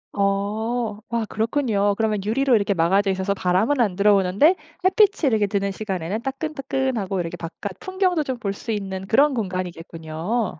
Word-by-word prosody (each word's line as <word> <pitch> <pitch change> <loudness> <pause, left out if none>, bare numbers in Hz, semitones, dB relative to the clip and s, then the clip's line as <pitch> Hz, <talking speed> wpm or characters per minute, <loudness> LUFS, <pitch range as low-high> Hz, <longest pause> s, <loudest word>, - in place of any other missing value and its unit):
어. 210 +3 -1
와 235 -1 -1
그렇군요. 220 -3 0
그러면 215 -3 0
유리로 255 +4 +2
이렇게 200 -2 +2
막아져 195 +4 +2
있어서 190 +1 0
바람은 200 +9 +1
안 200 -6 +1
들어오는데 200 - +4 0.3
햇빛이 380 -4 +4
이렇게 215 -3 +2
드는 200 -1 -1
시간에는 195 0 -3
따끈따끈하고 265 - -2
이렇게 175 0 -3
바깥 175 +4 -7
풍경도 375 -3 0
좀 260 -2 -3
볼 200 -5 -2
수 225 - -6
있는 190 -2 -4
그런 280 +7 +4
공간이겠군요. 180 -1 -3
205 Hz, 390 characters per minute, -23 LUFS, 190-245 Hz, 0.3 s, 들어오는데